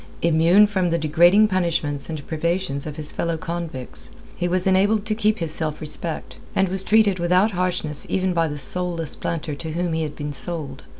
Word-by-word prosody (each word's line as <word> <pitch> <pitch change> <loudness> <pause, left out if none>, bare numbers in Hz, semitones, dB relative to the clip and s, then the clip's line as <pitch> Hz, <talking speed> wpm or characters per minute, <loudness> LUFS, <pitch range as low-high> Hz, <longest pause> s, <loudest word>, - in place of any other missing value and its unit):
Immune 170 +5 +5
from 190 -4 0
the 170 - +1
degrading 175 +7 +4
punishments 165 -7 -1
and 155 -3 -6
privations 165 -2 -2
of 150 - -6
his 155 -1 -3
fellow 170 -1 -2
convicts, 165 -6 -6 0.3
he 175 - -1
was 180 +1 0
enabled 200 +3 +2
to 220 - +3
keep 215 0 +1
his 165 -3 0
self 155 -1 +1
respect, 155 +1 -3 0.2
and 190 -1 +2
was 190 +1 0
treated 210 -3 +3
without 180 +5 +3
harshness 175 -5 -2
even 185 -1 0
by 165 -1 +1
the 150 -1 -5
soulless 170 +3 0
planter 160 -2 -4
to 155 +2 -6
whom 175 0 -1
he 160 - -1
had 150 -2 -4
been 145 0 -5
sold. 160 -1 -4
170 Hz, 190 wpm, -22 LUFS, 155-185 Hz, 0.3 s, Immune